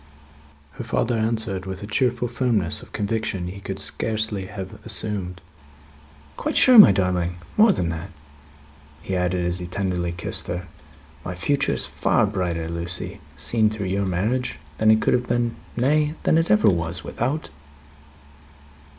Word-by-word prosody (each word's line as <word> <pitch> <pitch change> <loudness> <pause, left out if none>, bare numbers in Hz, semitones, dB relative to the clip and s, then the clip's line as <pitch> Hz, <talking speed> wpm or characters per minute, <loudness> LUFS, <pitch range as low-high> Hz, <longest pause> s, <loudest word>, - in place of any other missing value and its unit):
Her - - -3
father 115 +1 0
answered, 110 -4 -1
with 95 +1 -6
a - - -4
cheerful 120 +3 0
firmness 115 -8 0
of - - -14
conviction 105 -3 -2
he 100 +2 -8
could - - -5
scarcely 110 -3 -2
have 95 -2 -8
assumed, 90 -4 -4 1.0
"Quite - - -1
sure, 255 -3 +9
my 205 - +11
darling! 90 -2 0 0.2
More 215 0 +6
than 85 - -1
that," 80 +3 -5 0.9
he 95 - -3
added, 90 0 0
as 90 +1 -1
he 90 - -5
tenderly 90 -2 -2
kissed 85 0 -4
her: 90 +1 -4 0.6
"my 90 - -5
future 140 +10 +1
is - - 0
far - - +1
brighter, 90 -5 -2
Lucie, 85 +1 -4 0.2
seen 110 -2 +2
through 105 -3 -4
your 100 +1 0
marriage, 105 - -1 0.2
than 110 - +4
it 110 0 +5
could - - +3
have 125 0 +1
been 120 -1 0 0.2
nay, 150 +4 +2
than 160 - +4
it 165 - 0
ever 105 +1 +4
was 85 -2 0
without 130 - -3
it." - - -23
100 Hz, 160 wpm, -23 LUFS, 90-115 Hz, 1.0 s, my